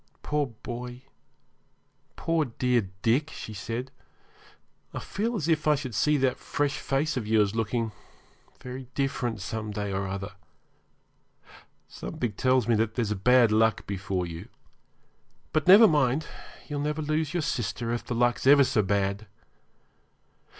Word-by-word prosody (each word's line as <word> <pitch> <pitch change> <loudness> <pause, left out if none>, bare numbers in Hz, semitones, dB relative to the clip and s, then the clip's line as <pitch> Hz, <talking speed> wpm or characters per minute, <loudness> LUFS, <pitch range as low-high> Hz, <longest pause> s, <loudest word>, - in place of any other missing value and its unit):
'Poor 150 -1 0 0.2
boy 125 +1 -6 1.1
poor, 165 -1 +1
dear 125 -4 0
Dick,' 130 +7 +2
she 110 - -8
said, 115 +6 -5 1.0
'I - - -2
feel 230 +4 -2
as 165 -7 -2
if 155 -2 +1
I 150 - +5
should 135 -4 -5
see 150 +8 +2
that 130 -2 +1
fresh 145 -1 -1
face 135 +2 -1
of 110 -4 -3
yours 105 -2 +3
looking 115 0 -1 0.7
very 125 0 -8
different 130 -6 -1
some 110 +2 -4
day 105 -1 -3
or 95 0 -2
other. 95 +1 -5 1.6
Something 120 -3 -4
tells 130 +4 +2
me 120 - +3
that 110 0 0
there's 110 -4 0
bad 120 +3 +4
luck 110 -1 +2
before 95 -2 -2
you. 85 0 -8 1.1
But 155 0 +1
never 205 +5 +10
mind, 145 -2 +2 0.4
you'll 145 -2 -3
never 150 +2 -2
lose 155 +1 -1
your 175 - 0
sister 120 -1 -2
if 120 - -3
the 120 - -4
luck's 120 +2 +1
ever 140 0 +8
so 130 -4 +2
bad. 100 +1 -1
125 Hz, 145 wpm, -27 LUFS, 110-145 Hz, 1.6 s, never